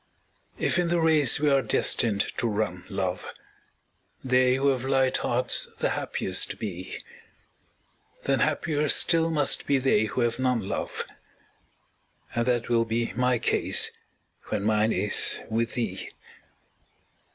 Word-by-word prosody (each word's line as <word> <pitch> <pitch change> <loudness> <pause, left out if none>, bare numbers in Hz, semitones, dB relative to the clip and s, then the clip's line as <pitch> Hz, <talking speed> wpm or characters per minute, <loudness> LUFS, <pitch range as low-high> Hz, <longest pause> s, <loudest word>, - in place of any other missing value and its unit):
If - - 0
in 175 - +1
the 170 0 +1
race 155 -6 +4
we 150 - +1
are 135 -1 +3
destined 110 -5 +1 0.2
to 120 - 0
run, 100 -5 -3
love, 95 -3 -3 1.0
They 130 0 +3
who 140 +1 +1
have 130 -2 -1
light 135 -1 +1
hearts 125 +1 +1
the - - 0
happiest 95 +1 -1
be, 95 -3 -7 1.2
Then - - 0
happier 150 -1 0
still 165 +2 +4
must 150 -4 +2
be 140 - +3
they 130 -5 +2
who 110 +4 -3
have 120 +1 -1
none, 125 -6 0
love. - - -4 1.3
And 120 +1 -1
that 120 -2 0
will 115 -1 +2
be 115 +1 -2
my 125 0 +1
case - - +1 0.5
when 100 - -3
mine 110 +1 +1
is 100 +1 +1
with 115 +2 -1
thee. 105 -6 -4
120 Hz, 135 wpm, -26 LUFS, 105-135 Hz, 1.3 s, race